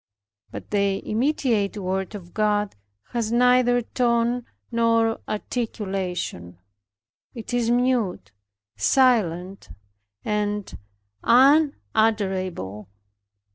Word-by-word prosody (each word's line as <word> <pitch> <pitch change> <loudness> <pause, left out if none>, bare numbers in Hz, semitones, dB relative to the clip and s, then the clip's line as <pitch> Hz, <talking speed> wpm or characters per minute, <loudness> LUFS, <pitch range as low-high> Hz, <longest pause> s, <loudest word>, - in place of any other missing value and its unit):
But - - -9
the 200 -1 0
immediate 225 -4 0
word 190 0 -3
of 175 -4 -10
God 210 -1 0 0.4
has 230 -2 -2
neither 245 0 +4
tone 235 0 0 0.3
nor 230 -1 +2
articulation. 190 - -4 0.8
It 230 0 -7
is 240 -1 +1
mute, 240 - 0 0.4
silent, 190 - +1 0.6
and 210 -1 -2 0.5
unutterable. 215 - +2
215 Hz, 75 wpm, -24 LUFS, 190-240 Hz, 0.8 s, neither